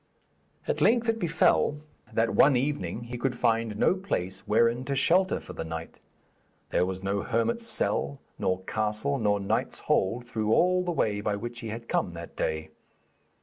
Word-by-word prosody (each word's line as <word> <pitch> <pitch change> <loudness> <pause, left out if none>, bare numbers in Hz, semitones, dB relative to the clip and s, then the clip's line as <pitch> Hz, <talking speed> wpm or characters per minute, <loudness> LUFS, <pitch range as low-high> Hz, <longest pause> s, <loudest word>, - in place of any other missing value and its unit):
At - - -1
length 235 0 +4
it 225 0 +1
befell 165 -4 +2 0.3
that 115 0 +1
one 140 -1 +6
evening 120 - -2
he 120 +1 -6
could 130 -1 0
find 115 -3 +1
no - - +4
place 95 - -3
wherein 115 +3 +3
to 140 - -1
shelter 180 +7 +3
for - - -10
the - - -4
night; 80 0 -7 0.7
there 90 - +2
was 95 0 -5
no 100 +1 0
hermit's 230 - 0
cell 140 -9 -1 0.2
nor 95 0 0
castle 110 +7 -1
nor 105 -2 +2
knight's 100 - -1
hold 115 +6 +1
through 110 -2 0
all 180 +1 +3
the 175 - -1
way 105 -10 0
by 105 0 0
which 120 +3 -6
he 115 - -6
had 115 +2 -6
come 90 - 0
that 85 0 -9
day. 80 0 -2
115 Hz, 175 wpm, -28 LUFS, 100-140 Hz, 0.7 s, one